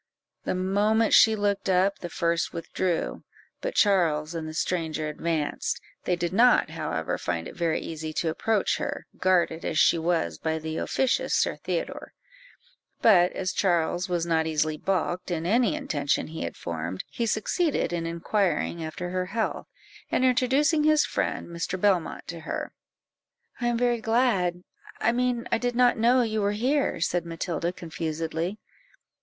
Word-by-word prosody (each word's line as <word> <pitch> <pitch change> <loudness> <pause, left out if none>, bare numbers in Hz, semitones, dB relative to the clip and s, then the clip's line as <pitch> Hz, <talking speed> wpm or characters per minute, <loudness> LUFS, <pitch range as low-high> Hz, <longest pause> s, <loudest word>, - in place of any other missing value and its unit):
The - - 0
moment 205 +4 +2
she 220 0 +7
looked 200 -1 -1
up, 190 +2 +2
the 175 - -6
first 170 0 0
withdrew, 170 +1 -2 0.4
but - - -3
Charles 165 -6 +2
and 160 -2 -4
the - - -7
stranger 160 -3 -1
advanced; 155 0 -2 0.3
they 180 - +2
did 175 0 -3
not, 240 -7 +5
however, 155 - -3
find 85 -1 -3
it - - -10
very 165 -2 0
easy 160 -1 -5
to 165 - 0
approach 210 +5 0
her, - - -4
guarded 175 -3 +2
as - - -2
she 165 - +5
was 160 - 0
by 160 0 -1
the 160 0 -4
officious 265 -2 0
Sir - - +1
Theodore; - - -4 0.9
but 180 -5 +6
as 185 -1 -2
Charles 175 0 +1
was 175 -2 0
not 160 -1 +1
easily 155 0 0
balked 180 +1 -1
in 165 -2 -2
any 235 - +3
intention 150 - -1
he 160 - -6
had - - -6
formed, 85 +2 -4
he 235 - -2
succeeded 270 - 0
in 165 -1 -2
inquiring 170 0 -1
after 175 +3 -5
her 185 0 -1
health, 220 +3 -2 0.4
and 255 - +2
introducing 270 +5 +3
his 305 0 +4
friend - - -2
Mr. 170 +2 -4
Belmont 190 -4 +1
to 170 - -5
her. - - -5 0.9
"I 240 - 0
am 240 -1 +1
very 240 -1 +1
glad 215 -7 +1 0.4
I 230 - +3
mean 245 0 0
I 230 - +2
did 245 0 -1
not 245 0 +4
know 245 +3 +4
you 220 -2 -1
were 200 0 +1
here," 260 - 0
said 175 +1 +1
Matilda 170 0 -3
confusedly. 165 +1 -4
180 Hz, 160 wpm, -26 LUFS, 165-225 Hz, 0.9 s, she